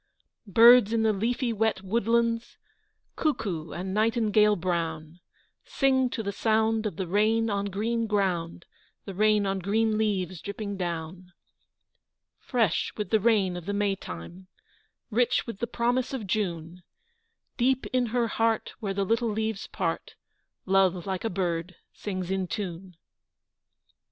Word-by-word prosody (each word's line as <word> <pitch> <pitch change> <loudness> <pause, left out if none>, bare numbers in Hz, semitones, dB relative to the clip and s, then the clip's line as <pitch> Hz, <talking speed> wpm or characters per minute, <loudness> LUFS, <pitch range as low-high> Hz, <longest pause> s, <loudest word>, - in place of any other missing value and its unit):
Birds 230 +1 +7
in 225 -1 +2
the 220 -1 +3
leafy 235 +4 -1
wet 220 -3 0
woodlands, 230 +3 0 0.6
Cuckoo 195 - -2
and 190 +2 -5
nightingale 215 -1 +3
brown, 165 -2 -3 0.4
Sing 260 -2 +2
to 230 -2 -4
the 200 - -2
sound 220 +1 +1
of 210 - -6
the 190 - -3
rain 215 +4 +2
on 200 0 -1
green 225 +4 -1
ground 180 -5 -1 0.4
The 195 - -6
rain 210 +1 +3
on 195 0 -1
green 215 +3 +1
leaves 190 -5 -1
dripping 200 0 -5
down! 175 0 -5 1.1
Fresh 225 - 0
with 210 - -4
the 220 - +4
rain 200 -4 +2
of 175 0 -8
the 205 - -1
May 200 -1 +1
time, 175 - -9 0.6
Rich 245 +2 +2
with 230 -4 -7
the 235 - -2
promise 245 +3 0
of 245 -6 -4
June, 180 -4 -3 0.8
Deep 260 +1 +2
in 250 -1 +2
her 235 +1 0
heart, 225 +1 0
where 200 -4 -3
the 200 0 0
little 230 +3 +1
leaves 220 -1 -2
part, - - -3 0.5
Love, 190 -2 +2
like 190 -2 -3
a 225 - 0
bird, 175 -2 -2 0.2
sings 185 -3 -4
in 190 -1 -1
tune! 185 -2 -5
V. - - -33
205 Hz, 145 wpm, -27 LUFS, 185-225 Hz, 1.1 s, Birds